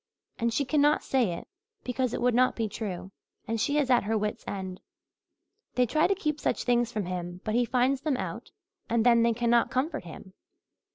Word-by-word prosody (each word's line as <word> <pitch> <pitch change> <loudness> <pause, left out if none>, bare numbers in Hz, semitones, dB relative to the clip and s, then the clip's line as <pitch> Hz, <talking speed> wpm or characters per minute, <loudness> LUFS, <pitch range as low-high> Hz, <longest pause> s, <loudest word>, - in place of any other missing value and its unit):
And 235 -1 +1
she 275 +5 0
cannot 295 +2 +3
say 245 -9 +1
it 170 - -8 0.4
because 255 -1 -1
it - - -3
would 250 0 +3
not 255 +2 +3
be 225 -2 -1
true, 195 -3 -5 0.4
and 225 -1 -1
she 285 - +1
is 275 -3 +2
at 240 -4 +4
her 220 +1 +1
wits' 210 0 -2
end. 190 -2 -5 0.9
They 250 - +4
try 305 +6 +2
to 395 - +1
keep 305 -6 -2
such - - -1
things 240 -1 +2
from 215 -5 -2
him 175 0 -5
but 215 - -2
he 240 +1 +3
finds 255 +3 +1
them 290 -3 0
out 190 +5 -5 0.4
and 230 0 +2
then 235 -1 +6
they 230 0 +3
cannot 235 0 +2
comfort 285 - -2
him. 185 +3 -11
235 Hz, 205 wpm, -28 LUFS, 210-260 Hz, 0.9 s, then